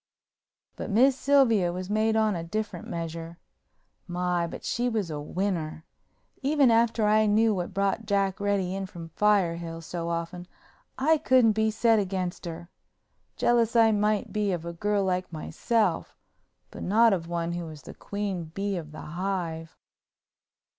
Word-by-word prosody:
But - - -5
Miss 250 +6 +4
Sylvia 255 -10 +3
was 180 +1 -5
made 215 +2 +1
on 215 -2 +2
a 165 - -4
different 200 +1 -4
measure. 165 0 -5 0.7
My, 175 -1 -1
but - - -8
she 245 +1 0
was 210 -8 -2
a 150 -1 -4
winner! 160 -2 -3 0.6
Even 280 -2 +4
after 230 -1 +3
I 215 +1 +4
knew 220 +1 +3
what 180 -3 -3
brought 200 +2 -1
Jack 195 -1 +1
Reddy 200 -2 0
in 195 0 -3
from 170 -2 -9
Firehill 170 -4 +1
so 170 0 -4
often 170 +1 -4 0.5
I 310 +4 +3
couldn't 255 -6 +4
be 220 +1 +1
set 225 0 +3
against 185 -2 -3
her. 170 +1 -8 0.7
Jealous 235 -1 +2
I 225 -1 +6
might 210 0 0
be 210 -2 0
of 170 -2 -4
a 170 - -5
girl 205 +3 0
like 185 -1 -1
myself, 185 +3 -1 0.6
but - - -9
not 225 +3 +4
of 170 -3 -2
one 170 0 -2
who 175 0 -4
was 155 -2 -10
the - - -9
queen 200 -4 -4
bee 195 +4 -3
of 155 -3 -7
the 155 - -9
hive. 170 -2 -4
195 Hz, 160 wpm, -27 LUFS, 170-220 Hz, 0.7 s, I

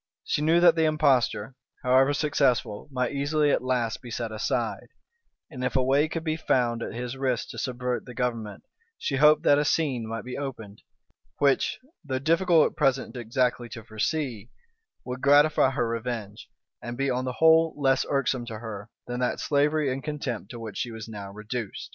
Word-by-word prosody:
She - - -1
knew 160 +3 +4
that 170 -2 +7
the 160 -1 +2
impostor, 135 -6 +2 0.3
however 130 +2 +4
successful, 140 -6 0
might 125 -2 -1
easily 145 +1 +1
at - - +1
last 125 -3 -1
be 125 - -10
set 115 -1 -4
aside; 110 0 -2 0.6
and 130 -4 -6
if 125 - -1
a 130 - +3
way 140 +4 +3
could 160 +1 -4
be 155 -1 -1
found 120 -7 +1
at - - -4
his 125 +1 -4
risk 130 -3 -1
to - - -7
subvert 125 -1 -3
the 125 - -9
government, 115 -5 -3 0.3
she 135 - -2
hoped 150 +2 +5
that 145 -3 +5
a - - +2
scene 140 -7 0
might 115 0 -5
be 125 +2 -5
opened, 115 -7 -7 0.6
which, 140 -1 +2 0.3
though 135 -4 -2
difficult 165 +3 +3
at - - -24
present 135 -1 +1
exactly 120 0 -1
to 115 - -8
foresee, 115 0 -3 0.6
would 125 0 -5
gratify 145 +2 +5
her 125 -3 -1
revenge, 115 -3 -5 0.3
and 120 0 -6
be 135 0 0
on 125 +1 -1
the 130 - -2
whole 160 +2 +4
less 135 -2 +2
irksome 130 -3 0
to 110 -2 -6
her 110 -1 -8 0.2
than 125 0 -4
that 125 - -1
slavery 145 -1 +1
and 135 - -6
contempt 135 -9 -4
to 120 - -8
which 110 -3 -7
she 120 - -2
was 110 -1 -8
now 100 -3 -8
reduced. 105 +1 -6
130 Hz, 185 wpm, -26 LUFS, 115-145 Hz, 0.6 s, that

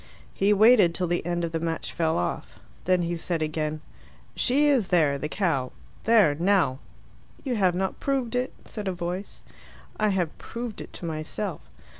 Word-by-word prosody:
He 200 +2 +2
waited 210 -4 +6
till 185 - 0
the 175 0 -1
end 175 -1 0
of 165 - -5
the 165 - -1
match 165 0 -3
fell 160 -2 +1
off. 90 - -3 0.3
Then 185 -1 +3
he 170 0 -1
said 165 -1 -2
again, 155 0 -2 0.5
"She 280 +4 +2
is 270 -9 +3
there, 155 -6 +2
the 150 - -3
cow. 155 -11 -1 0.3
There, 215 -9 +5
now." 170 -5 +2 0.6
"You 255 -3 -1
have 185 -3 +3
not 190 +1 -2
proved 265 -4 -1
it," 250 +1 0
said 210 -3 -6
a 190 - 0
voice. 180 +3 -5 0.6
"I 215 0 +3
have 180 -5 -1
proved 235 -2 -6
it - - -9
to - - -8
myself." 155 -1 -4
180 Hz, 175 wpm, -26 LUFS, 160-210 Hz, 0.6 s, waited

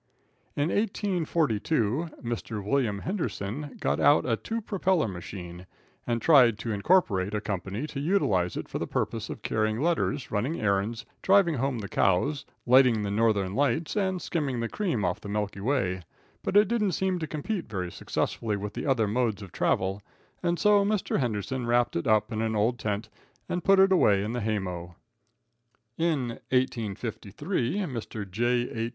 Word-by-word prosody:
In 145 +3 +1
1842, 165 - 0
Mr. 115 -3 -4
William 110 -1 +1
Henderson 145 - -4
got - - 0
out 145 - +5
a 115 - +2
"two 225 - -4
propeller" 190 - +1
machine, 90 -1 -8 0.4
and 120 -1 0
tried 125 -7 +6
to 110 +2 -4
incorporate 105 - +2
a - - +1
company 100 - -3
to 150 - -6
utilize 125 - +1
it - - -5
for - - -4
the - - -3
purpose - - -2
of - - -7
carrying 110 0 0
letters, 160 -3 0
running 120 +10 -1
errands, 105 +2 0 0.2
driving 195 -3 +4
home 135 -1 -1
the 105 -3 -5
cows, 140 +12 +1 0.2
lighting 125 -3 +5
the 100 - -2
Northern 100 -3 +1
Lights 145 - 0
and 190 -3 0
skimming 145 -8 -2
the 115 - -1
cream 165 - -1
off 90 0 -1
the 100 - -7
Milky 105 -1 -2
Way, 100 -6 0 0.4
but 200 - +1
it 210 - +6
didn't 210 -5 +1
seem 185 +1 0
to 160 - -3
compete 165 +6 -4
very 90 -4 -3
successfully 105 +4 -2
with 105 +1 -6
other 130 -6 +2
modes 110 -2 0
of 95 - -11
travel, 95 +2 0 0.4
and 175 -1 0
so 205 0 +4
Mr. 205 -5 0
Henderson 120 +1 -2
wrapped 120 0 +2
it 85 - -1
up 110 +1 +3
in 110 -1 -2
an 110 -1 0
old 110 +3 +1
tent 105 0 -2 0.4
and 175 -1 -2
put 195 +1 +5
it 190 0 +6
away 100 - +4
in 110 +3 -3
the 120 - -2
hay 110 0 0
mow. 90 -3 -5 1.0
In 145 -8 -1
1853, 125 - -1
Mr. 115 - -5
J.H. 120 +2 0
120 Hz, 165 wpm, -27 LUFS, 105-160 Hz, 1.0 s, tried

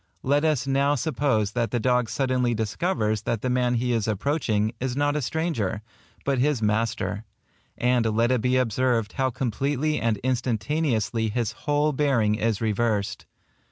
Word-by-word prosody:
Let 145 +3 +2
us 150 -6 +1
now 140 +1 +2
suppose 135 -8 0
that 115 0 -1
the 120 - -1
dog 125 -1 +1
suddenly 125 -3 0
discovers 110 - -1
that 115 0 -2
the 130 - 0
man 125 -1 +1
he 125 +1 0
is 115 -2 0
approaching, 110 -1 0
is 130 0 -2
not 145 0 +1
a 150 - 0
stranger, 125 - -2 0.4
but 140 -2 +1
his 145 0 +2
master; 110 0 -1 0.5
and 125 0 +2
let 115 +3 +2
it 125 -3 +2
be 125 +2 +2
observed 120 -2 +1
how 130 -1 +1
completely 135 +5 -1
and 115 -2 +1
instantaneously 120 -2 0
his 115 0 -1
whole 150 +3 0
bearing 130 -7 +2
is 110 0 -1
reversed. 110 -2 -1
125 Hz, 160 wpm, -25 LUFS, 110-140 Hz, 0.5 s, Let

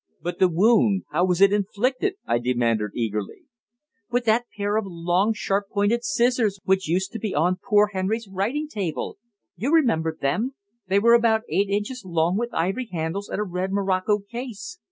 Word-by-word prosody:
"But 175 +3 -5
the 185 - +5
wound 200 +2 +3
how 175 +4 +2
was 180 0 0
it 200 0 +6
inflicted?" 250 - 0
I 120 - +1
demanded 120 -3 0
eagerly. 105 -4 -3 0.7
"With 245 0 0
that 230 +2 +2
pair 205 0 -1
of 220 -1 0
long, 175 +4 +1
sharp 200 -2 -1
pointed 210 +4 +1
scissors 225 -1 +1
which 190 -2 +1
used 180 +4 0
to 230 - -6
be 210 -1 -3
on 180 +5 +1
poor 210 -3 +3
Henry's 205 +4 -2
writing 215 +11 -2
table. 200 - -4 0.4
You 230 - -2
remember 165 - +2
them. 220 - -1 0.3
They 190 +1 +2
were 230 +3 +5
about 225 -2 +4
eight 200 0 +1
inches 210 +5 -2
long, 170 -1 0
with 235 +3 -2
ivory 195 +9 -1
handles 170 +4 -3
and - - -3
a - - +1
red 185 0 -3
morocco 195 +1 +1
case. 235 - -8
200 Hz, 175 wpm, -24 LUFS, 180-230 Hz, 0.7 s, it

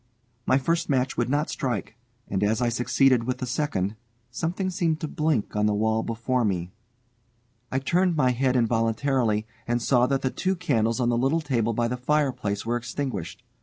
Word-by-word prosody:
My 130 - +5
first 165 +5 0
match 130 -2 +1
would 120 0 0
not 145 +3 0
strike, 120 -7 -3 0.3
and 95 0 -1
as 110 +2 +2
I 120 -1 +2
succeeded 125 0 +2
with 125 0 -1
the 130 - -3
second, 125 -7 -1 0.4
something 180 +8 -2
seemed 165 -3 0
to 155 - -2
blink 150 -9 -1
on 105 0 +2
the 105 - +1
wall 110 +1 +1
before 115 +2 -1
me. 90 -4 -1 1.0
I 130 - 0
turned 175 +6 +2
my 130 -4 +3
head 130 +1 +1
involuntarily, 115 -1 +1 0.2
and 120 0 +1
saw 125 +1 +3
that 135 0 0
the 130 - 0
two 190 0 -1
candles 120 -10 0
on 120 -1 +2
the 120 - +2
little 135 +6 +2
table 120 -6 0
by 120 +1 +1
the 125 +1 -3
fireplace 125 -7 0
were 120 +1 0
extinguished. 120 - -5
125 Hz, 185 wpm, -25 LUFS, 115-140 Hz, 1.0 s, My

